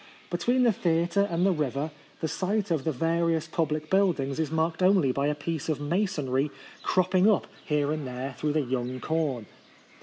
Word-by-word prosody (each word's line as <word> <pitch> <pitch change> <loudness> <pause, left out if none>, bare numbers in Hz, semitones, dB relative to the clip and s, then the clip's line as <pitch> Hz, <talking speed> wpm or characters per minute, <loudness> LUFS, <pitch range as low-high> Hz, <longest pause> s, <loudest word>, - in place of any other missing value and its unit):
Between 240 +9 +2
the 235 - +5
theatre 175 +3 +1
and 170 +2 +1
the 195 - +4
river 150 -2 -1 0.3
the 160 - 0
site 200 +3 -1
of 155 -5 0
the 160 - +2
various 165 +2 +1
public 155 -2 -2
buildings 165 -8 +2
is 160 -3 0
marked 160 +2 0
only 185 -7 +4
by 140 +2 0
a 150 - 0
piece 160 +1 -4
of 155 - 0
masonry 150 -5 0 0.3
crop 185 0 +1
ping 190 +2 +5
up 210 - +2 0.2
hero 150 -1 +1
and 155 -3 -3
there 130 +2 -5
through 150 +2 -1
the 155 - +2
young 130 -1 -3
corn. 150 -8 -1
160 Hz, 185 wpm, -27 LUFS, 145-180 Hz, 0.3 s, the